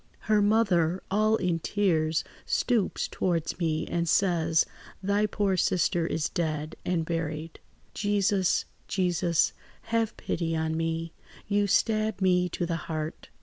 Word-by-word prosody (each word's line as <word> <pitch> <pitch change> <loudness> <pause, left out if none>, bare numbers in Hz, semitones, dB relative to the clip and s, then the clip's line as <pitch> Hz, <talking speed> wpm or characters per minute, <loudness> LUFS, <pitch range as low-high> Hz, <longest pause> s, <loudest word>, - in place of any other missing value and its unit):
"Her 215 -1 +2
mother, 190 -5 +2
all 215 +2 +3
in 180 -5 0
tears, 160 -5 +1 0.2
stoops 230 -6 0
towards 170 -2 -1
me 160 -2 0
and 170 -1 -1
says, 165 -4 +3 0.4
'Thy 200 +2 +2
poor 200 -2 0
sister 175 -1 +1
is 155 -2 -1
dead 155 -3 -2
and 170 -3 0
buried.' 160 -1 -4 0.3
"Jesus! 200 -2 +1 0.2
Jesus! 175 -3 +1 0.4
Have 230 -1 +1
pity 165 -1 -2
on 160 0 -1
me! 165 0 -2 0.3
You 205 0 +2
stab 215 0 +1
me 180 -2 +3
to 175 - -2
the 165 -1 -1
heart. 155 0 -4
175 Hz, 130 wpm, -28 LUFS, 165-205 Hz, 0.4 s, all